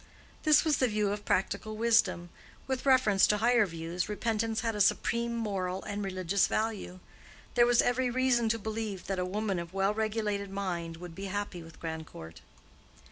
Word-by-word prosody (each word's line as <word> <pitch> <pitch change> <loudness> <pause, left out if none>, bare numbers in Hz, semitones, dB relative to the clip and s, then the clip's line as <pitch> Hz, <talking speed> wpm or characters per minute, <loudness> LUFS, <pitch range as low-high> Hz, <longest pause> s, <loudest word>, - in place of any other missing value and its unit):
This 305 0 +5
was 310 -2 +3
the 255 - +3
view 210 -2 0
of 205 0 -5
practical 210 +3 -1
wisdom; 220 -6 +2 0.3
with 265 +1 -3
reference 250 -7 +5
to 210 - +2
higher 235 0 +3
views, 165 +2 -4
repentance 220 +1 -1
had 225 -1 -1
a 210 - 0
supreme 235 +4 +1
moral 195 -4 -2
and 205 0 -4
religious 190 0 +1
value. 215 -4 -2 0.5
There 240 0 +5
was 240 0 +4
every 250 +1 +1
reason 245 -2 +2
to 230 - +1
believe 215 -3 -4
that 195 -2 -2
a 180 - 0
woman 200 0 -2
of 170 +2 -8
well 195 +1 +2
regulated 210 -2 -1
mind 175 -4 -4
would 175 0 -9
be 195 +4 -7
happy 200 -2 -4
with 165 0 -14
Grandcourt. 160 - -7
205 Hz, 175 wpm, -30 LUFS, 185-230 Hz, 0.5 s, This